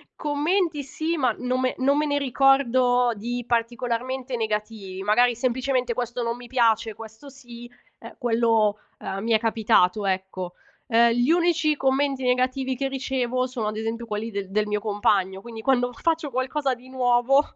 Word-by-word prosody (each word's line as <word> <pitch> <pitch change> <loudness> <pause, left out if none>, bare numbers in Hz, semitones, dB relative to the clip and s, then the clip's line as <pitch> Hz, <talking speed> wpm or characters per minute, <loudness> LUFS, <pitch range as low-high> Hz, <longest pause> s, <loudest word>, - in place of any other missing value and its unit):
Commenti 305 +1 0
sì, 315 +5 -3
ma 255 -5 +2
non 250 0 -1
me 255 0 0
non 275 +2 +2
me 300 - +1
ne 285 -1 0
ricordo 255 -2 +3
di 240 +4 -4
particolarmente 245 +2 -2
negativi, 210 -4 -4
magari 240 +4 +3
semplicemente 250 0 0
questo 245 0 -3
non 235 0 -2
mi 245 0 -11
piace, 230 -3 +2
questo 220 +6 -12
sì, 240 -3 -12 0.3
eh - - -11
quello 225 -3 +2 0.2
eh 195 - -5
mi 230 +2 -2
è 220 - +4
capitato, 215 -3 +2
ecco. 185 -1 -3 0.3
Ehm, 235 0 +4
gli 245 +5 +2
unici 335 -3 +2
commenti 270 0 0
negativi 255 +1 0
che 270 +2 -2
ricevo 255 -2 -1
sono 245 -4 -4
ad 215 0 -3
esempio 225 +1 -3
quelli 220 +1 -4
de 200 -2 -4
del 210 +1 0
mio 210 0 -1
compagno, 200 -2 0
quindi 225 0 -9
quando 245 0 +2
faccio 325 +3 -1
qualcosa 265 +2 -1
di 250 +1 -12
nuovo, 250 +1 +3
245 Hz, 165 wpm, -24 LUFS, 225-265 Hz, 0.3 s, è